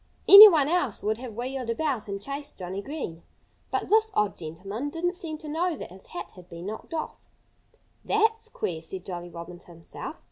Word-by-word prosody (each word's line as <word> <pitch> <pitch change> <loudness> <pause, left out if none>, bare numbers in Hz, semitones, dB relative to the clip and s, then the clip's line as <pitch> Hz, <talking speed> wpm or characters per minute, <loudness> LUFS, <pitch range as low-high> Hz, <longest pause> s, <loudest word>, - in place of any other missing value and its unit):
Anyone 395 -8 +11
else 300 - 0
would 215 +2 -1
have 245 -4 -8
wheeled 250 +1 -4
about 255 -2 -1
and 200 0 -4
chased 280 +6 -6
Johnnie 185 +1 -5
Green. 200 - -6 0.5
But - - -2
this 440 +1 +4
odd 210 -1 +1
gentleman 195 - -6
didn't 345 +3 -2
seem 330 -4 -6
to 305 - -10
know 330 +3 -1
that - - -8
his 190 +1 -11
hat 175 - -7
had 180 -1 -16
been 170 0 -9
knocked 215 - -6
off. 315 - -4 0.8
"That's 445 +1 +1
queer!" 160 -3 -4
said 185 +3 -7
Jolly 175 -2 -6
Robin 170 +1 -9
to - - -18
himself. 165 -1 -9
230 Hz, 185 wpm, -26 LUFS, -, 0.8 s, Anyone